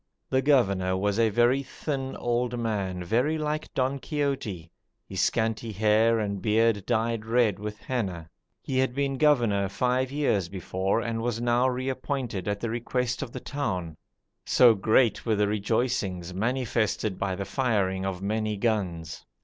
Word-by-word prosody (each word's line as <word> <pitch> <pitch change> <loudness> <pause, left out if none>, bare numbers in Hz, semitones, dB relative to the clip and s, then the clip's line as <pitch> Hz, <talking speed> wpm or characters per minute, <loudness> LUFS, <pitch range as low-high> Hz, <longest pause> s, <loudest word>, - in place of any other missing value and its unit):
The 130 - +3
governor 100 -10 +2
was 100 +2 0
a 115 -1 +4
very 120 +5 +3
thin 135 -1 -4
old 120 0 -1
man 100 -6 -2
very 125 - +1
like 155 0 -3
Don 135 +1 0
Quixote, 130 - -3 0.4
his - - -2
scanty 110 0 0
hair 110 +3 +3
and 100 -3 -2
beard 110 0 +2
dyed 115 0 0
red 115 -3 +2
with 105 0 -5
henna. 95 -10 -3 0.4
He 130 -1 -1
had 130 -1 +1
been 140 -1 -1
governor 115 -10 +3
five 125 +5 0
years 110 - 0
before, 95 +3 -1
and 115 -1 -2
was 115 -1 -1
now 120 +1 +2
reappointed 130 -5 -3
at 100 0 -1
the 115 - -2
request 125 +1 -2
of 135 -4 -5
the 130 - -6
town, 95 - -3 0.5
so 120 -2 +6
great 110 +2 +2
were 110 -2 +1
the 105 0 +2
rejoicings, 105 -4 -1
manifested 110 -2 -1
by 95 -2 -1
the 100 +1 -4
firing 100 -5 0
of 95 -1 -3
many 110 +1 -1
guns. 90 -7 -2
115 Hz, 155 wpm, -27 LUFS, 100-125 Hz, 0.5 s, so